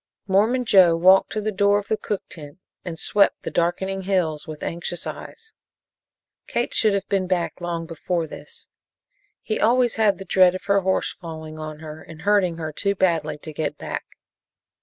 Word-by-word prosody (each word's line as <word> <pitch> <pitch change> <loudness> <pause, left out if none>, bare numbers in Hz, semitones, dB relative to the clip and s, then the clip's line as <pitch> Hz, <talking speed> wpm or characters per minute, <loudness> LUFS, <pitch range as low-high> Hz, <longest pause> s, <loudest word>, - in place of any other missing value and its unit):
Mormon 220 +6 +2
Joe 185 -6 +6
walked 185 +4 +5
to 215 - -1
the 215 +1 -1
door 200 +1 +3
of 205 - -4
the 220 - +1
cook 205 -2 -4
tent 150 -1 -10 0.3
and 170 -2 -6
swept 200 +4 +2
the - - -4
darkening 190 +3 -1
hills 180 -6 -1
with 155 -1 -8
anxious 175 +1 -4
eyes. 450 -1 -9 0.9
Kate 240 - -1
should 215 -2 +3
have 195 0 -2
been 190 -2 0
back 180 -1 -1
long 170 -1 -3
before 165 +1 -2
this. 465 - -10 0.8
He 215 - -2
always 240 +1 +3
had 205 -4 +3
a 195 - -7
dread 185 -1 +4
of 185 - -6
her 200 0 +2
horse 190 0 0
falling 160 -2 -8
on 155 0 -7
her 155 0 -8
and 160 0 -12
hurting 195 -4 +2
her 155 -1 -4
too 200 +5 -1
badly 165 -6 +1
to 155 - -7
get 155 +1 -3
back. - - -5
185 Hz, 180 wpm, -23 LUFS, 165-200 Hz, 0.9 s, Joe